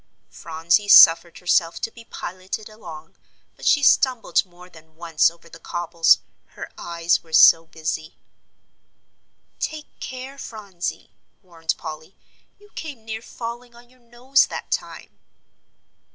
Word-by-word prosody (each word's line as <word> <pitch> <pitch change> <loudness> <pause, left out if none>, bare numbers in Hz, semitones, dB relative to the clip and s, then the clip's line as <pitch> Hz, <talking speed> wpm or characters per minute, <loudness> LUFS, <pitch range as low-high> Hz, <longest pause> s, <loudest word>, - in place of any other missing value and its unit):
Phronsie 165 +5 0
suffered 170 -3 +7
herself 170 -1 +1
to 225 - -3
be 230 - -14
piloted 185 +3 -7
along, 165 -8 -12 0.4
but - - -7
she 290 - +4
stumbled 260 -3 +3
more 180 -1 -17
than 160 -2 -19
once 165 -2 +2
over 170 0 -19
the 165 - -14
cobbles, 170 -1 +2 0.4
her - - -8
eyes 170 0 -1
were 160 -1 -20
so 165 +1 +7
busy. 160 -1 -5 1.4
"Take 310 -1 -4
care, 260 +2 -8
Phronsie," 200 -8 -7 0.3
warned 165 -3 -4
Polly, 160 +2 -9 0.4
"you 415 0 -22
came 280 -9 -8
near 220 0 -5
falling 235 +1 -8
on 240 +1 -18
your 255 - -25
nose 245 +3 +1
that - - -8
time." - - -5
180 Hz, 130 wpm, -22 LUFS, 165-235 Hz, 1.4 s, suffered